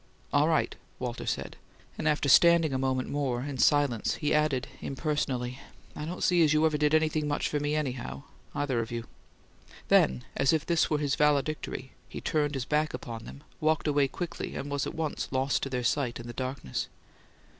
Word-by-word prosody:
"All - - +4
right," - - +1 0.2
Walter 125 -2 -4
said; - - -3 0.4
and - - -2
after 150 -1 +2
standing 165 +1 +6
a 130 - 0
moment 130 -1 0
more, 130 -4 -1
in 140 -2 -5
silence, 145 -7 +3
he 150 - 0
added, 150 -3 +1
impersonally, 135 -3 -2 0.4
"I 150 - -5
don't 175 +3 -4
see 175 -2 +4
as 150 -1 +4
you 155 +1 +4
ever 155 -1 +2
did 150 +1 +3
anything 155 -1 +1
much 145 - 0
for 150 - -1
me, 145 +1 0
anyhow 125 - -3 0.3
either 135 -4 0
of 115 0 -3
you." 120 -1 -4 0.8
Then, 65 -1 +4
as 135 - +3
if 160 -1 +1
this 170 -2 +2
were 150 - +2
his 145 -2 0
valedictory, 150 -2 0 0.2
he - - -6
turned 150 -2 0
his 130 -2 -2
back 150 0 +1
upon 115 -3 -7
them, 140 - -11 0.2
walked 155 0 +1
away 145 -2 +3
quickly, 175 +5 -5
and 140 +1 -5
was 145 -1 -1
at - - -6
once 160 -2 -2
lost 130 +1 +1
to 135 - -2
their 125 -2 -2
sight 120 -1 0
in 120 - -8
the 120 - -7
darkness. 130 - -3
145 Hz, 195 wpm, -29 LUFS, 130-155 Hz, 0.8 s, standing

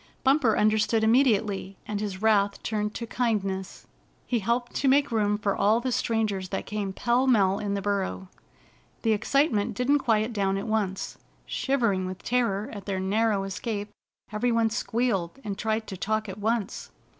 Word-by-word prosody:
Bumper 265 -4 +3
understood 220 +1 +2
immediately, 220 -5 +2
and 210 -1 -2
his 200 -1 -4
wrath 205 -2 +2
turned 210 -1 -2
to 235 - -4
kindness. 200 -6 -2 0.4
He 240 - 0
helped 235 +4 -1
to 275 - +1
make 280 +1 +4
room 210 -2 +1
for 205 -1 0
all 210 +3 +3
the 255 +1 -2
strangers 215 -6 -1
that - - -3
came 205 -2 -3
pell 240 +6 +1
mell 200 -6 +3
in 200 -1 -2
the 200 - -3
burrow. 195 -1 -2 0.8
The 225 - +3
excitement 230 -1 +1
didn't 275 +5 +2
quiet 225 -2 +1
down 195 -2 0
at 195 - -4
once. 210 -4 -2 0.3
Shivering 230 -9 0
with 185 0 -7
terror 230 -4 0
at 200 -2 -8
their 195 -2 -1
narrow 205 +1 +1
escape, 205 +1 -4 0.4
every 215 +3 0
one 230 -1 +2
squealed, 225 -5 -1
and 205 -3 -3
tried 220 +1 -1
to 195 - -6
talk 215 +3 -1
at 195 +1 -7
once. 220 -1 -2
215 Hz, 165 wpm, -27 LUFS, 200-235 Hz, 0.8 s, make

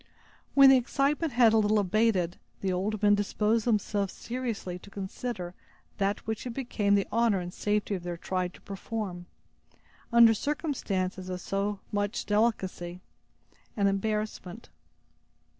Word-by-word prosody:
When 275 -1 +9
the 265 - +7
excitement 275 +4 0
had 240 -2 +5
a 225 - +5
little 215 0 +3
abated, 200 -3 +1 0.2
the 190 -1 0
old 205 +3 -2
men 205 0 +6
disposed 210 +2 +1
themselves 205 -3 0
seriously 230 -7 -4
to 200 - -14
consider 195 -1 -5 0.5
that 200 0 0
which 220 +2 -3
it 235 - -6
became 210 -6 +1
the 200 - +2
honor 230 -4 +2
and 180 0 -6
safety 210 0 -1
of 185 - -2
their 175 0 -5
tribe 180 +1 -2
to - - -16
perform, 195 -3 -5 0.8
under 235 -1 +7
circumstances 205 - -2
of 180 0 -3
so 195 +2 -2
much 205 +2 -1
delicacy 190 -5 0 0.8
and 200 -1 +3
embarrassment. 210 0 -2
205 Hz, 140 wpm, -29 LUFS, 190-230 Hz, 0.8 s, When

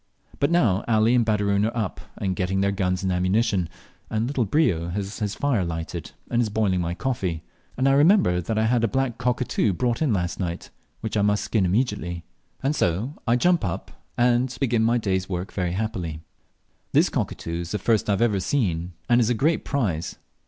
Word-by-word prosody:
But 140 - +2
now 115 - +3
Ali 110 +1 +3
and 125 -1 +4
Baderoon 100 -2 +1
are 115 +2 -1
up 105 -6 -2 0.2
and 95 -2 -1
getting 95 +1 -1
ready - - +2
their 100 0 +2
guns 95 -2 -1
and 95 - 0
ammunition, 90 0 +1 0.4
and 110 +1 0
little 130 -2 0
Brio 95 - +1
has 100 +4 -4
his 105 -2 -2
fire 135 -9 +1
lighted 80 -1 -4 0.2
and 120 - +3
is 115 - 0
boiling 100 -4 +1
my 85 0 -2
coffee, 95 -10 -2 0.3
and 130 +2 +2
I - - +5
remember 145 - +4
that 110 +6 -2
I 110 - +2
had 115 0 +2
a - - +4
black 130 -1 -1
cockatoo 125 -4 +1
brought 120 - -1
in 150 -5 +2
late 95 -4 +2
last 90 - -5
night, 85 -2 -4 0.3
which 110 - -3
I 105 - +2
must 105 0 +2
skin 105 -5 +1
immediately, 90 -5 -1 0.4
and 140 +3 +1
so 100 - 0
I 115 - +4
jump 175 +7 +3
up 90 -4 -3 0.3
and 120 +1 +2
begin 120 -4 +1
my 115 +2 +3
day's 95 -4 -1
work 90 0 -4
very 90 -2 -1
happily. 90 -6 -3 0.7
This - - +4
cockatoo 85 0 -3
is 85 - -6
the 105 - -1
first 110 +1 +1
I 100 - +4
have 105 -4 +2
seen, 90 - -1
and 120 0 +4
is 115 - +2
a 125 - +2
great 155 +8 +1
prize. 95 - -2
105 Hz, 205 wpm, -24 LUFS, 90-120 Hz, 0.7 s, I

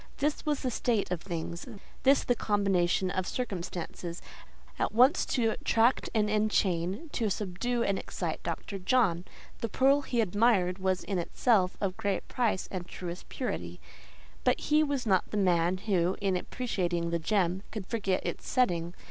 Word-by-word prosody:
This 295 +2 -1
was 295 -2 +1
the 255 - -1
state 225 -5 0
of 175 -3 -1
things, 170 0 -5 0.3
this 275 +1 +4
the 245 - +2
combination 195 -4 +1
of 185 0 -2
circumstances, 175 -5 -4 0.6
at - - 0
once 255 +9 +5
to 235 -4 +1
attract 230 +3 +2
and 210 -1 +3
enchain, 210 - 0
to 225 -6 0
subdue 215 +5 -1
and 200 -3 0
excite - - -4
Dr. 195 - -4
John. 185 -4 +2 0.3
The 230 - -2
pearl 275 +5 +4
he 245 -3 -2
admired 205 -3 +2
was 185 -1 0
in 195 -3 -2
itself 185 +1 +2
of 190 -2 -2
great 200 -4 -1
price 235 -7 0
and 180 -2 -4
truest 175 0 -7
purity, 255 - -4 0.6
but - - +3
he 300 +1 +3
was 285 -4 0
not 190 -4 +2
the 210 - -3
man 180 -2 +2
who, 185 -3 +1
in 195 -2 +1
appreciating 180 -5 -2
the 170 - 0
gem, 185 0 +1
could 215 -4 -6
forget 195 -4 -1
its - - -4
setting. 175 -9 +1
195 Hz, 160 wpm, -30 LUFS, 180-235 Hz, 0.6 s, once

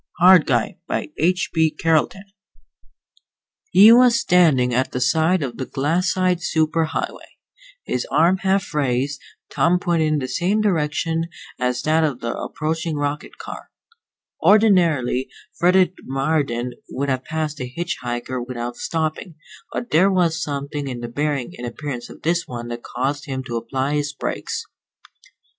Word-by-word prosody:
_ - - -51 0.2
HARD 185 -4 +7
GUY 120 -4 0
By - - -3
H. 180 +4 +1
B. 160 -1 +3
CARLETON 165 +5 0 1.5
He 215 - +8
was 240 0 +6
standing 150 -9 +3
at 130 +2 0
the 125 - -1
side 160 +6 +2
of 120 -4 -5
the 130 - -4
glassite 180 +5 0
super 160 0 +1
highway, 160 - -5 0.5
his 125 - -2
arm 165 +6 +3
half 190 -2 0
raised, 140 -1 -1 0.3
thumb 175 +2 +3
pointed 170 -3 +1
in 155 0 +1
the 130 -3 -3
same 185 +9 0
direction 165 -4 0 0.3
as 125 0 -1
that 160 +1 +2
of 145 -5 -1
the 115 0 -3
approaching 160 +1 -3
rocket 145 0 -3
car. - - -9 0.7
Ordinarily 170 - +3 0.3
Frederick 180 +1 +4
Marden 135 -3 -1 0.2
would 140 +2 -3
have 130 -1 -1
passed 155 -1 -3
a 125 - -3
hitch 170 +7 -4
hiker 120 +1 -3
without 120 -1 -5
stopping, 160 +1 -3 0.4
but 240 - -5
there 180 +5 +5
was 170 -4 +1
something 140 0 -4
in 125 -2 -5
the 120 - -4
bearing 140 0 -2
and 120 - -4
appearance 125 -1 -6
of - - -13
this 170 +2 0
one 120 -1 -6
that 120 0 -5
caused 135 +5 -3
him 130 -2 -4
to 120 -3 -5
apply 130 +5 -2
his 145 0 -1
brakes. - - -4
150 Hz, 150 wpm, -21 LUFS, 130-170 Hz, 1.5 s, He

